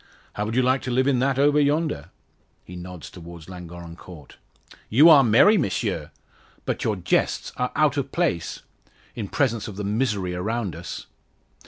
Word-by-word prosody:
"How 105 - -2
would 110 +2 -3
you 130 - +3
like 130 +1 +2
to - - -5
live 130 +1 +2
in 135 -3 +2
that 135 +1 +1
over 145 +2 +4
yonder?" 145 - 0 0.5
He 90 - -11
nods 90 -3 -9
towards 85 -2 -11
Llangorren 85 -2 -9
Court. 85 -5 -13 0.5
"You 145 +9 +7
are 145 -4 +8
merry, 160 - +5
Monsieur. 100 - -2 0.6
But - - -2
your 110 - 0
jests 90 -1 0
are 125 0 -2
out 150 -2 +2
of 140 -1 -2
place 145 - -1 0.5
in 110 -4 -5
presence 115 -2 0
of 105 - -7
the 105 - -5
misery 105 -4 -1
around 100 0 -2
us." 85 +1 -7
110 Hz, 170 wpm, -24 LUFS, 90-135 Hz, 0.6 s, are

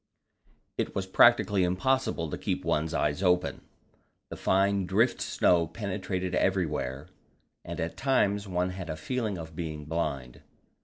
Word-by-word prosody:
It - - -2
was 95 - -1
practically 105 -1 +5
impossible 90 - 0
to - - -3
keep - - -2
one's 80 +1 0
eyes 75 +1 0
open; 90 -2 +1 0.7
the - - -4
fine 95 0 +1
drift 110 +7 +2
snow 85 -2 +2
penetrated 95 -1 -3
everywhere, 75 -8 -1 0.5
and - - -6
at 80 0 -3
times 105 -7 +1
one 90 0 -1
had 90 -2 -7
a 80 - -2
feeling 110 +4 -2
of 80 -1 -9
being 75 -3 -5
blind. 70 -6 -3
90 Hz, 140 wpm, -28 LUFS, 80-100 Hz, 0.7 s, practically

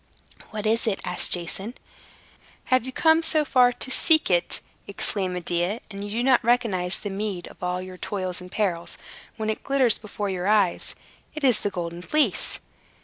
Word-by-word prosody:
"What 215 -1 -5
is 225 +2 +2
it?" 200 -3 0
asked 180 0 -1
Jason. 190 +6 -2 1.0
"Have 255 -1 +3
you - - -4
come 320 +4 +4
so 315 -2 +2
far 250 -2 +5
to 260 +2 -4
seek 315 - +4
it," 175 -1 +2 0.3
exclaimed 195 -2 -2
Medea, 175 +4 -1
"and 200 0 -7
do 205 - -4
you 225 +4 -2
not 260 -1 +4
recognize 215 -7 +1
the 205 - -5
meed 195 -2 -4
of - - -17
all 180 0 -2
your 185 0 -9
toils 185 -2 -3
and 180 0 -11
perils, 175 -5 -2 0.4
when 220 -1 -3
it 215 - -6
glitters 265 -5 +3
before 210 -1 -5
your 185 -1 -2
eyes? 205 -4 +2 0.4
It 305 - -6
is 250 -5 +4
the 205 - 0
Golden 170 -2 -5
Fleece." 270 0 0
205 Hz, 180 wpm, -25 LUFS, 180-245 Hz, 1.0 s, far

